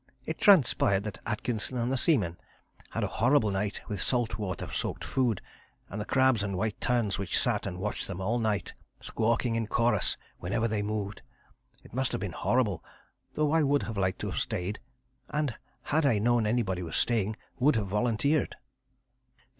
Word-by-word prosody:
It 160 Hz, -, -4 dB
transpired 125 Hz, -, +5 dB
that 105 Hz, -2 st, -5 dB
Atkinson 120 Hz, +2 st, -1 dB
and 120 Hz, +1 st, 0 dB
the -, -, +2 dB
seaman 110 Hz, -, +2 dB, 0.5 s
had -, -, -2 dB
a -, -, +1 dB
horrible 120 Hz, -3 st, +4 dB
night 100 Hz, +1 st, -2 dB
with 105 Hz, -, -3 dB
salt 120 Hz, -3 st, 0 dB
water 95 Hz, -4 st, -3 dB
soaked -, -, -2 dB
food, 120 Hz, -7 st, 0 dB, 0.5 s
and 105 Hz, +2 st, -3 dB
the -, -, -4 dB
crabs 130 Hz, -4 st, +3 dB
and 100 Hz, -2 st, -2 dB
white 110 Hz, +1 st, -2 dB
terns 115 Hz, -6 st, +1 dB
which 100 Hz, -3 st, -1 dB
sat -, -, +1 dB
and 90 Hz, -, -4 dB
watched 105 Hz, +3 st, -3 dB
them 95 Hz, -1 st, -5 dB
all 110 Hz, +6 st, 0 dB
night, 105 Hz, -4 st, -1 dB, 0.3 s
squawking 115 Hz, +1 st, 0 dB
in 115 Hz, -1 st, -1 dB
chorus 120 Hz, +2 st, +1 dB, 0.2 s
whenever 105 Hz, +6 st, 0 dB
they 105 Hz, -2 st, -1 dB
moved. 105 Hz, -1 st, -3 dB, 0.6 s
It -, -, -16 dB
must 130 Hz, +1 st, 0 dB
have -, -, -2 dB
been 95 Hz, -3 st, -3 dB
horrible, 110 Hz, -3 st, 0 dB, 0.5 s
though 150 Hz, -1 st, +1 dB
I 160 Hz, 0 st, +4 dB
would 140 Hz, -6 st, +1 dB
like 95 Hz, -2 st, 0 dB
to -, -, -4 dB
have -, -, -2 dB
stayed, 95 Hz, +4 st, -2 dB, 0.5 s
and 150 Hz, -4 st, 0 dB, 0.3 s
had 160 Hz, +2 st, +1 dB
I 130 Hz, -7 st, +4 dB
known 115 Hz, +1 st, +2 dB
anybody 105 Hz, -6 st, 0 dB
was 80 Hz, -2 st, -5 dB
staying 110 Hz, -3 st, +1 dB, 0.2 s
would 140 Hz, +3 st, +4 dB
have 110 Hz, -2 st, +1 dB
volunteered. 120 Hz, +8 st, +1 dB
110 Hz, 175 wpm, -29 LUFS, 100-125 Hz, 0.6 s, transpired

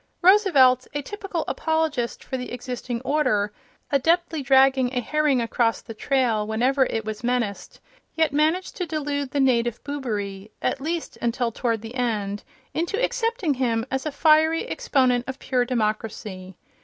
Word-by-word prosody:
Roosevelt, 300 Hz, -, +5 dB
a 290 Hz, -, -2 dB
typical 390 Hz, -2 st, -4 dB
apologist 315 Hz, -7 st, -1 dB
for -, -, -5 dB
the 250 Hz, -1 st, -5 dB
existing 245 Hz, -1 st, -5 dB
order, 215 Hz, -8 st, +1 dB, 0.4 s
adeptly 325 Hz, +2 st, +2 dB
dragging 265 Hz, -1 st, +4 dB
a -, -, +2 dB
herring 295 Hz, +2 st, +1 dB
across 230 Hz, 0 st, +1 dB
the 225 Hz, -, -8 dB
trail 230 Hz, -3 st, 0 dB
whenever 255 Hz, +4 st, +2 dB
it 225 Hz, -1 st, -3 dB
was 215 Hz, +1 st, -5 dB
menaced, 235 Hz, -5 st, -2 dB, 0.4 s
yet 320 Hz, -3 st, +2 dB
managed 315 Hz, +5 st, +1 dB
to 360 Hz, -, -2 dB
delude 290 Hz, -3 st, -2 dB
the 285 Hz, -, -2 dB
native 240 Hz, -3 st, +2 dB
boobery, 210 Hz, -8 st, -4 dB
at -, -, -1 dB
least 330 Hz, +3 st, -4 dB
until 235 Hz, 0 st, 0 dB
toward 230 Hz, -1 st, -1 dB
the 225 Hz, +1 st, -8 dB
end, 210 Hz, -5 st, -2 dB, 0.3 s
into 345 Hz, +6 st, -1 dB
accepting 465 Hz, -9 st, 0 dB
him 235 Hz, -3 st, 0 dB
as 265 Hz, +3 st, -2 dB
a -, -, -2 dB
fiery 315 Hz, +2 st, +3 dB
exponent 255 Hz, -, +1 dB
of 265 Hz, 0 st, -5 dB
pure 250 Hz, -2 st, 0 dB
democ 215 Hz, -4 st, 0 dB
racy. 190 Hz, -4 st, -8 dB
260 Hz, 155 wpm, -24 LUFS, 230-305 Hz, 0.4 s, Roosevelt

